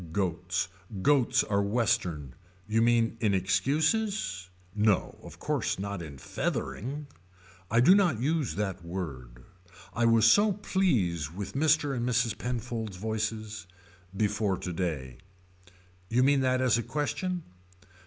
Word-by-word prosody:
Goats. 90 -1 -1 0.4
Goats 135 -2 +3
are 100 -1 0
Western. 100 - 0 0.3
You 110 +1 +2
mean 115 -1 +2
in 105 -4 +2
excuses. 135 - 0 0.2
No 105 -2 +1
of - - -12
course - - -1
not 100 -1 -4
in 75 -4 -8
feathering. 135 - -3 0.6
I 115 +2 +4
do 160 +9 +7
not 180 - +3
use 145 - 0
that 95 -3 -3
word. 65 -9 -6 0.5
I 120 - +1
was 115 -1 +5
so 205 - +5
pleased 95 - 0
with 100 0 -5
Mr. 150 -1 +2
and 120 - -2
Mrs. 120 -2 +1
Penfold's 115 -4 -4
voices. 110 -1 -3 0.5
Before 105 -2 0
to 90 - -5
day. 75 -8 -3 0.9
You 125 +3 +3
mean 140 0 +4
that 130 0 +2
as 125 -2 +3
a - - 0
question. 175 +6 -2
110 Hz, 130 wpm, -29 LUFS, 95-130 Hz, 0.9 s, do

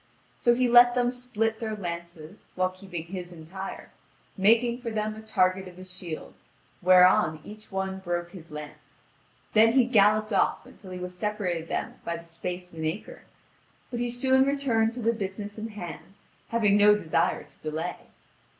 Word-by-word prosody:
So 240 0 +4
he 250 0 +2
let 245 0 +7
them 245 -1 +2
split 225 -3 -1
their 220 -2 -3
lances, 170 -2 -7
while 185 0 +1
keeping 185 -3 -7
his 180 0 -7
entire, 175 +4 -8 0.4
making 235 +5 +3
for 235 - -3
them 215 -1 -2
a 215 - -9
target 190 -3 +1
of 180 -1 -12
his 185 0 -9
shield, 170 -4 -7 0.5
whereon 180 -3 +5
each 215 +1 -11
one 190 0 -2
broke 175 -2 -3
his 170 -3 -11
lance. 150 -1 -10 0.5
Then 225 +1 +6
he 260 -1 +6
galloped 215 -2 +3
off 195 - +1
until 190 - -14
he 185 - -6
was 180 0 -6
separated 185 -5 -2
from - - -2
them - - -3
by 170 0 -3
the 170 - -12
space 180 +2 -5
of 165 - -10
an 160 - -2
acre; 165 +7 -5 0.7
but 240 - -3
he 240 0 -1
soon 260 +2 +3
returned 265 -5 +1
to 245 -1 -6
the 230 +1 +3
business 205 0 -5
in 220 - -4
hand, 195 -3 -9 0.3
having 210 -3 +3
no 210 0 +7
desire 170 -2 0
to - - -18
delay. 160 +3 -5
195 Hz, 180 wpm, -27 LUFS, 180-225 Hz, 0.7 s, let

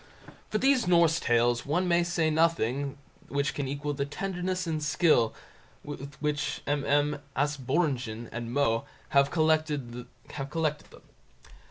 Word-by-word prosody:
For 215 - 0
these 265 -2 +3
Norse 170 -2 +4
Tales 120 0 +2
one 175 +6 0
may 175 0 +3
say 170 -2 +1
that - - -1
nothing 140 -4 +1 0.3
can 140 0 -1
equal 145 +2 -3
the 140 0 -1
tenderness 185 +4 -3
and 160 -2 -2
skill 150 -7 +3 0.5
with 140 0 -8
which 150 -1 -2
MM. 145 +1 +1 0.2
Asbjörnsen 135 -5 -1
and 120 0 -5
Moe 120 -4 +1 0.2
have 140 0 +4
collected 155 -5 +1
them. 135 +6 -5
145 Hz, 125 wpm, -28 LUFS, 135-165 Hz, 0.5 s, Norse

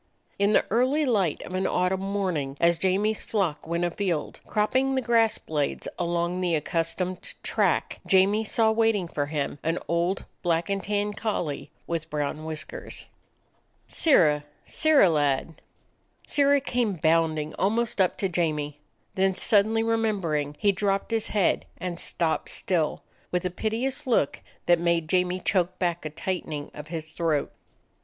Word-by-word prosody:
In 200 +1 +3
the - - +4
early 260 +7 +2
light 200 - +1
of 180 - -8
an 185 +1 0
autumn 180 +1 +1
morning, 185 -9 -2
as 170 -1 +3
Jamie's 200 +4 +1
flock 180 -9 -2
went 170 +1 0
afield, 175 -3 -2
cropping 260 +6 +1
the 260 - +1
grass 230 -2 +3
blades 150 -3 -2
along 175 +1 -1
the 175 -2 +1
accustomed 165 +4 -2
track, - - +1
Jamie 195 +3 +4
saw 220 +1 +3
waiting 220 -4 +2
for 145 -3 -2
him 145 -1 -3
an 165 +2 0
old 170 +3 0 0.2
black 170 +1 0
and 195 -1 -1
tan 205 0 -1
collie 200 -9 -3 0.2
with 165 -2 -3
brown 150 +1 -3
whiskers. 155 -1 -5 0.8
"Sirrah, 150 - +3 0.2
Sirrah 310 -9 +4
lad!" 145 +1 0 0.6
Sirrah 285 -1 +3
came 245 -5 0
bounding 160 -2 +1
almost 225 +1 +1
up 185 - +2
to 195 - 0
Jamie. 150 -4 -1 0.3
Then, 190 0 +2
suddenly 220 +3 +3
remembering, 195 -11 0
he 205 - +3
dropped 195 +2 -1
his 225 -1 0
head 205 -4 +1
and 175 -2 -4
stopped 165 -2 0
still, 165 -5 -1 0.3
with 180 0 -1
a 180 - -1
piteous 250 +9 -2
look 225 - +2 0.3
that 175 -1 +4
made 170 -1 +1
Jamie 180 0 +1
choke 180 -1 0
back 175 -2 -1
a - - -2
tightening 155 -2 -4
of 150 +1 -9
his 160 -1 -6
throat. 160 -4 0
180 Hz, 150 wpm, -26 LUFS, 160-210 Hz, 0.8 s, the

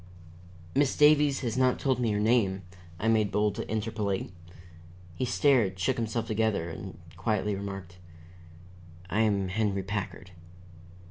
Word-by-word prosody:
"Miss 140 0 +2
Davies 150 -2 +5
has 120 -3 -2
not 130 -1 +3
told 130 -3 0
me 120 -2 +1
your 105 -1 0
name," 105 -4 +2 0.4
I 110 - -1
made 110 -3 +3
bold 105 0 +1
to - - -6
interpolate. 105 -4 -2 0.8
He 125 - -2
stared, 125 -7 +2
shook 95 - 0
himself 115 0 -2
together, 110 -6 0
and 95 +3 -8 0.2
quietly, 105 +1 0
remarked: 95 -3 -6 1.1
"I 105 - +1
am 100 -4 +1
Henry 100 -1 0
Packard." 100 -1 -5
105 Hz, 135 wpm, -28 LUFS, 95-115 Hz, 1.1 s, Davies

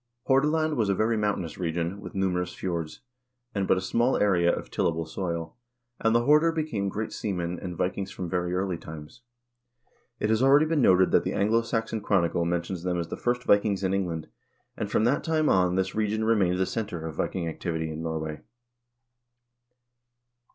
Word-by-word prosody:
Hordaland 150 +3 +2
was 110 -4 +1
a 100 - +2
very 110 +3 +1
mountainous 105 -6 -2
region, 85 +3 -2
with 95 -1 -9
numerous 90 -2 -1
fjords, 85 -4 -4 0.5
and 100 -2 -1
but - - +4
a - - -1
small 120 +7 +1
area 90 -4 +3
of - - -5
tillable 80 0 0
soil, 85 -1 -4 0.4
and 115 0 +2
the 120 - +4
Horder 150 +3 +5
became 150 -12 -2
great 110 +3 -4
seamen 90 -4 -3
and 90 -3 -6
Vikings 95 +1 -2
from 90 - -5
very 90 0 -1
early 95 -2 -1
times. 80 +8 -10 1.0
It 105 - 0
has 110 +1 +2
already 140 +3 +6
been 155 -2 +1
noted 95 -4 +5
that - - +4
the - - -2
"Anglo 110 +3 +2
Saxon 115 -1 -2
Chronicle" 85 -4 +1
men 85 0 0
tions 90 -1 -5
them 90 0 -1
as 85 - -4
the - - -3
first 125 0 -1
Vikings 100 -2 +2
in 95 0 +1
England, 85 -5 -2 0.5
and 105 - -3
from 105 - +2
that 125 +5 +2
time 160 -2 +1
on, 90 -1 +3
this 95 0 0
region 110 0 0
remained 100 -5 +2
the 95 - +2
center 95 -4 -4
of 80 - -5
Viking 85 +2 -2
activity 80 -1 -3
in 80 +1 -5
Norway. 80 -2 -4
95 Hz, 185 wpm, -27 LUFS, 85-110 Hz, 1.0 s, already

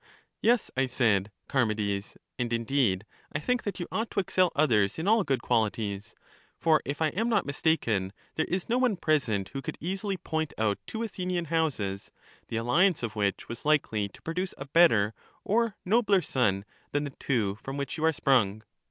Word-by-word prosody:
Yes, 235 -1 +3
I 135 0 +2
said, 110 -5 +1 0.2
Charmides; 105 -6 0 0.2
and 120 -1 -1
indeed 115 -4 +1 0.3
I - - +1
think 250 +9 0
that 200 -3 -4
you 175 - -3
ought 225 +1 -1
to - - -1
excel 185 -2 +2
others 110 -10 +3
in 160 +4 -3
all 220 0 +5
good 140 -5 -1
qualities; 105 -1 -1 0.4
for 160 -2 +3
if 145 +3 -2
I 155 - +3
am 225 +9 -1
not 215 -4 +2
mistaken 120 - +1 0.2
there 160 - -1
is 185 0 -1
no 240 +2 +2
one 245 -6 +2
present 125 - +1
who 135 - -5
could - - -5
easily 190 +4 -2
point 160 -3 -3
out 105 -2 +1
two 225 +1 -4
Athenian 180 -5 -2
houses, 110 -12 -1 0.4
the 115 - -3
alliance 155 +9 +3
of 115 -2 -3
which 100 -3 -1
was 115 0 -7
likely 125 -9 +1
to - - -18
produce 180 +3 -3
a 135 - -6
better 135 -9 +4 0.3
or 225 0 +1
nobler 200 -2 +3
son 100 -8 +1 0.3
than 145 0 +1
the 140 -2 -5
two 105 -6 0
from 135 +1 -5
which 140 +2 -3
you 160 - -4
are 160 - +5
sprung. 110 -8 +2
140 Hz, 185 wpm, -28 LUFS, 110-180 Hz, 0.4 s, all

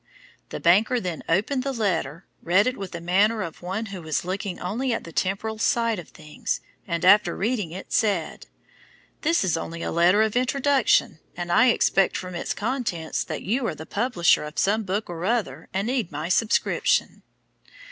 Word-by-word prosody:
The - - -5
banker 210 +8 +4
then 180 -6 -4
opened 210 +11 +1
the 275 +1 -2
letter, 190 - -2 0.2
read 185 +5 +3
it 255 - 0
with 195 -2 -7
the 170 - -5
manner 200 +5 +2
of 165 -3 -8
one 190 +5 -3
who 185 - -6
was 160 0 -2
looking 190 0 -4
only 235 +9 -2
at - - -3
the 165 - -10
temporal 200 +6 -2
side 230 -2 +1
of 170 - -10
things, 150 -1 -4 0.3
and 170 0 -1
after 205 +3 +5
reading 215 -4 -1
it 185 +3 -8
said, 200 -8 0 0.7
'This 330 -3 +2
is 175 -4 +1
only 165 +1 -5
a - - -2
letter 180 +6 +4
of 220 0 -1
introduction, 265 - +2 0.2
and 175 -1 -4
I 225 +8 +5
expect 195 -5 +3
from 180 -1 -6
its 170 - -3
contents 210 -8 -2
that - - -5
you 235 +5 0
are 155 - -3
the 160 - -9
publisher 200 -7 +2
of 150 +1 -8
some 210 +3 +2
book 205 +1 -2
or 170 -1 -6
other 185 - -1
and 195 +2 -1
need 240 -6 -1
my 155 +3 -4
subscription.' 220 +4 +1
195 Hz, 185 wpm, -24 LUFS, 170-225 Hz, 0.7 s, after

